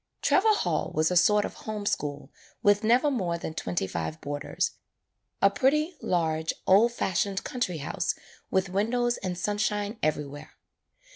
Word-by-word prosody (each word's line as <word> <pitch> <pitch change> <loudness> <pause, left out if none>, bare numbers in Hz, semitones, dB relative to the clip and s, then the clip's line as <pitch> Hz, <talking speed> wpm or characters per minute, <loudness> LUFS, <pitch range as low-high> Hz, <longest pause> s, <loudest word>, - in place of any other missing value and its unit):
Trevor 430 +2 +4
Hall - - -1
was 155 +2 +2
a - - +1
sort 210 +4 +5
of - - -6
home 215 -1 -6
school 145 -7 -2 0.3
with 205 -1 +4
never 245 +7 +4
more 180 -10 -1
than 160 - -5
twenty 90 - -2
five 80 -3 -4
boarders, 145 0 -2 0.7
a 200 - +6
pretty, 300 - +2
large 160 -2 0
old 210 +5 +5
fashioned 195 -3 -1
country 215 -9 -2
house 140 - -2 0.3
with 190 0 +1
windows 240 +5 +1
and 185 -2 -4
sunshine 205 +2 -1
everywhere. 150 0 -3
195 Hz, 145 wpm, -27 LUFS, 160-220 Hz, 0.7 s, a